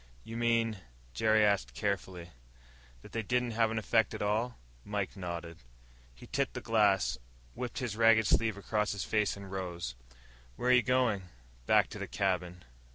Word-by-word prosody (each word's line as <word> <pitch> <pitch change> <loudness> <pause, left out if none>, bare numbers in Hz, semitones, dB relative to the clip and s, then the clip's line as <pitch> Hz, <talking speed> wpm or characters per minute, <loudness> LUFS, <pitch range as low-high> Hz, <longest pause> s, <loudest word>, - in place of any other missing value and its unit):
"You 115 - -8
mean," 115 -2 +1 0.3
Jerry 110 - +4
asked 95 -13 +1
carefully, 95 -3 -3 0.7
"that - - -13
they 115 - -2
didn't 125 +2 0
have 115 0 +2
any 110 - -3
effect 110 -1 +2
at - - -6
all?" 110 +4 0 0.3
Mike 100 -2 -3
nodded. 85 -3 -6 0.6
He - - -13
tipped - - -1
the - - -2
glass, 100 - +2 0.3
wiped 125 - -5
his 120 -5 -2
ragged 115 -1 +5
sleeve 110 -1 +2
across 105 +1 -1
his 100 - -3
face, 105 -2 0
and 100 -1 -10
rose. 85 -8 -4 0.6
"Where 125 - +1
are - - +7
you 125 - +6
going?" 115 -7 +1 0.4
"Back - - +5
to - - -8
the - - -4
cabin." 90 -2 -1
105 Hz, 165 wpm, -31 LUFS, 95-115 Hz, 0.7 s, are